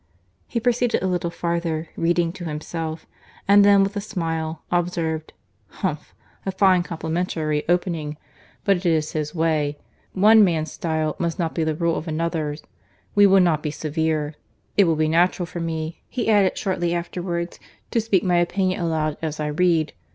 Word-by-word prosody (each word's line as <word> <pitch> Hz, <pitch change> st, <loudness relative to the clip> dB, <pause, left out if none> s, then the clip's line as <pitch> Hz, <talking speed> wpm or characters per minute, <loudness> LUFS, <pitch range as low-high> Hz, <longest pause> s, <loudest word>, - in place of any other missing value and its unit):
He 235 Hz, -, -2 dB
proceeded 245 Hz, -1 st, +1 dB
a -, -, +1 dB
little 180 Hz, -2 st, -1 dB
farther, 170 Hz, -2 st, -2 dB
reading 170 Hz, 0 st, +1 dB
to 185 Hz, -2 st, -8 dB
himself; 160 Hz, +1 st, -5 dB, 0.4 s
and 200 Hz, +1 st, +7 dB
then, 200 Hz, -1 st, +6 dB
with 200 Hz, +2 st, -2 dB
a 205 Hz, -, -1 dB
smile, 165 Hz, -6 st, -3 dB
observed, 170 Hz, -3 st, -1 dB, 0.4 s
"Humph! -, -, -4 dB, 0.3 s
a 195 Hz, -, -2 dB
fine 190 Hz, -1 st, +4 dB
complimentary 160 Hz, -2 st, -2 dB
opening: 165 Hz, -4 st, 0 dB, 0.5 s
But 195 Hz, -2 st, +4 dB
it 180 Hz, -, -9 dB
is 155 Hz, -2 st, +1 dB
his 150 Hz, +1 st, -3 dB
way. 155 Hz, -3 st, +1 dB, 0.4 s
One 215 Hz, +3 st, +6 dB
man's 160 Hz, -4 st, +1 dB
style 155 Hz, -2 st, -1 dB
must 170 Hz, 0 st, -1 dB
not 165 Hz, -3 st, -1 dB
be 165 Hz, -, 0 dB
the 155 Hz, -1 st, 0 dB
rule 170 Hz, 0 st, 0 dB
of 165 Hz, -, -5 dB
another's. 155 Hz, -2 st, -2 dB, 0.5 s
We 205 Hz, -1 st, +6 dB
will 195 Hz, 0 st, +6 dB
not 165 Hz, -4 st, +2 dB
be 150 Hz, -, -2 dB
severe." 155 Hz, 0 st, -1 dB, 0.4 s
"It 200 Hz, -, +6 dB
will 165 Hz, -2 st, +2 dB
be 155 Hz, 0 st, +1 dB
natural 175 Hz, +3 st, +2 dB
for 170 Hz, +1 st, -7 dB
me," 160 Hz, -1 st, -4 dB
he 240 Hz, -3 st, -2 dB
added 200 Hz, -3 st, +3 dB
shortly 175 Hz, -3 st, -1 dB
afterwards, 175 Hz, 0 st, -3 dB, 0.3 s
"to 230 Hz, -, +2 dB
speak 205 Hz, -5 st, +1 dB
my 180 Hz, -2 st, +2 dB
opinion 185 Hz, +1 st, +1 dB
aloud 155 Hz, -3 st, -1 dB
as 155 Hz, -2 st, -3 dB
I 150 Hz, 0 st, -1 dB
read. 160 Hz, -1 st, +2 dB
170 Hz, 170 wpm, -23 LUFS, 160-185 Hz, 0.5 s, and